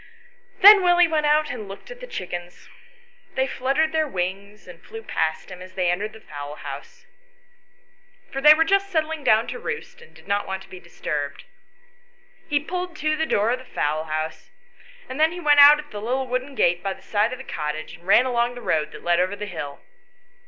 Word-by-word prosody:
Then 405 +1 +10
Willie 355 -1 +5
went 310 -2 0
out 300 0 +2
and 220 -5 -7
looked 195 - -11
at - - -10
the - - -9
chickens. 175 - -7 0.7
They 265 - +2
fluttered 275 +4 0
their 315 -1 +1
wings 195 0 -5
and 175 -2 -13
flew 450 0 -10
past 160 - -2
him 180 0 -9
as 185 0 -12
he 180 -2 +1
entered 205 +4 -3
the 220 - -12
fowl 145 -5 -8
house, - - -9 1.3
for 270 - -4
they 300 +2 +9
were 325 - +4
just 395 +3 +1
settling 320 -3 -2
down 220 -1 +4
to - - -6
roost 470 +1 -6
and 475 - -18
did - - -18
not 200 0 -1
want 190 0 -4
to - - -19
be 185 - -10
disturbed. 150 -4 -5 1.1
He 290 -1 +2
pulled 360 +3 -5
to 310 0 0
the 320 +1 -1
door 210 +3 +1
of 250 - -1
the - - -12
fowl 155 -8 -2
house, 155 0 -4 0.6
and 260 +2 -7
then 315 +1 +4
he 355 - -7
went 295 -3 +4
out 290 +1 +10
at 300 -1 -10
the 205 - -6
little 255 +4 -1
wooden 255 +2 -3
gate 175 -5 +2
by 195 0 -2
the - - -18
side 215 +2 +1
of 255 - -5
the 265 - -9
cottage, 155 -3 -5
and 170 +2 -21
ran 235 +6 +6
along 245 -1 0
the 245 - -9
road 155 -8 0
that - - -11
led 175 0 +2
over 185 +3 0
the 210 +1 -6
hill. 150 -7 -7
245 Hz, 215 wpm, -23 LUFS, -, 1.3 s, Then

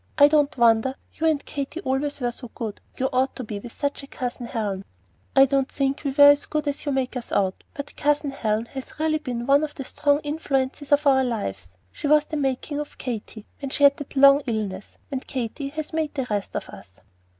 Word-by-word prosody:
I 285 - +9
don't 295 -2 +2
wonder 235 +2 +4 0.2
you 325 - 0
and 305 -3 +1
Katy 285 +3 -4
always 285 -2 -1
were 245 -2 0
so 245 0 -10
good; 220 -3 -5 0.2
you 260 - +1
ought 260 +1 +1
to 255 - -5
be 210 -2 -5
with 235 +3 -9
such 285 +3 -2
a 275 - -11
Cousin 250 -3 -5
Helen." 205 -5 -3 0.5
"I 270 0 +8
don't 275 0 +1
think 275 0 -1
we 280 - 0
were 285 +1 +8
as 285 0 0
good 305 -1 -2
as 285 +1 -2
you - - +2
make 265 -1 -1
us 245 -2 -5
out, 190 -1 0
but 285 0 -7
Cousin 295 -1 +1
Helen 220 -4 -1
has 265 +2 -8
really 310 0 +1
been 245 -5 -4
one 280 +3 +4
of 300 -1 -4
the 270 - -5
strong 285 +2 +2
influences 290 -2 -2
of 290 +1 +4
our 265 -1 +5
lives. 95 - -3 0.2
She 290 - -4
was 300 0 +5
the 310 - -4
making 280 +1 -1
of 295 - -6
Katy, 220 -3 -6
when 275 - -4
she 285 - -1
had 280 0 +7
that 290 - -9
long 275 +1 +7
illness; 210 -4 -3
and 265 -1 -4
Katy 265 +2 -3
has 310 +1 -5
made 315 -2 -1
the 265 -3 -1
rest 205 -1 -2
of - - -4
us." 95 0 -13
275 Hz, 225 wpm, -24 LUFS, 240-290 Hz, 0.5 s, I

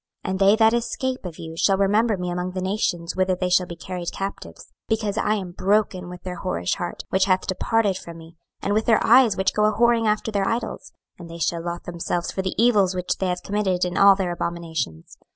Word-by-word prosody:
26:006:009 - - -1
And 190 - -2
they 200 +1 +6
that 220 0 +4
escape 255 +1 -2
of 170 -3 -7
you 160 0 -8
shall 195 +3 +2
remember 210 +2 +2
me 180 -1 -3
among 180 +1 -3
the 185 - -3
nations 185 -3 -1
whither 185 0 +1
they 180 0 -2
shall 180 0 +3
be 170 - -7
carried 180 0 -5
captives, 195 0 -7 0.2
because 215 -2 -1
I 215 0 +1
am 190 -4 -5
broken 190 -1 0
with 180 0 -10
their 180 -1 -5
whorish 85 +1 -2
heart, 175 - -5
which 190 0 +2
hath 185 -1 +1
departed 205 +1 0
from 170 -1 -10
me, 165 +1 -14 0.3
and 200 - 0
with 215 +1 0
their 225 -2 +3
eyes, 235 -3 +5
which 190 0 +1
go 210 - +2
a 215 - +4
whoring 235 -1 +3
after 210 +1 0
their 200 -2 0
idols: 230 +1 -3 0.3
and 170 -1 -10
they 165 - -8
shall 170 +1 -1
lothe 175 0 -5
themselves 175 0 -3
for 190 - -2
the 190 -1 -3
evils 205 -6 +3
which 180 0 -2
they 190 - 0
have 180 0 -2
committed 195 -3 0
in 180 0 -4
all 200 0 +7
their 190 -2 -2
abominations. 165 - -4
190 Hz, 230 wpm, -23 LUFS, 175-210 Hz, 0.3 s, all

